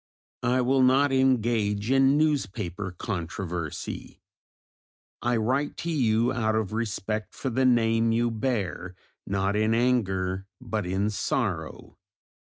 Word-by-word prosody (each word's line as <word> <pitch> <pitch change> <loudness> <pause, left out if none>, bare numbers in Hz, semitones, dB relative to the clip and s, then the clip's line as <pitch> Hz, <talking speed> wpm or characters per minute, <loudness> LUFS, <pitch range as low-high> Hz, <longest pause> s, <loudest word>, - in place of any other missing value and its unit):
I 125 +1 +2
will 130 +2 +2
not 135 +2 +4
engage 115 -5 +1
in 135 +1 +4
newspaper 105 - -1
controversy. 85 -4 -5 1.0
I 120 0 +1
write 130 +6 0
to 170 - -3
you, 120 -4 +2
out 110 -3 0
of 110 -2 -1
respect 110 -1 -3
for 135 - -3
the 130 +3 +1
name 115 -2 +3
you 120 +1 +1
bear, 105 -6 -2 0.3
not 100 +1 0
in 110 +1 +2
anger 95 -6 0
but 110 -6 -3
in 100 +3 0
sorrow. 105 - -3
115 Hz, 120 wpm, -26 LUFS, 100-125 Hz, 1.0 s, not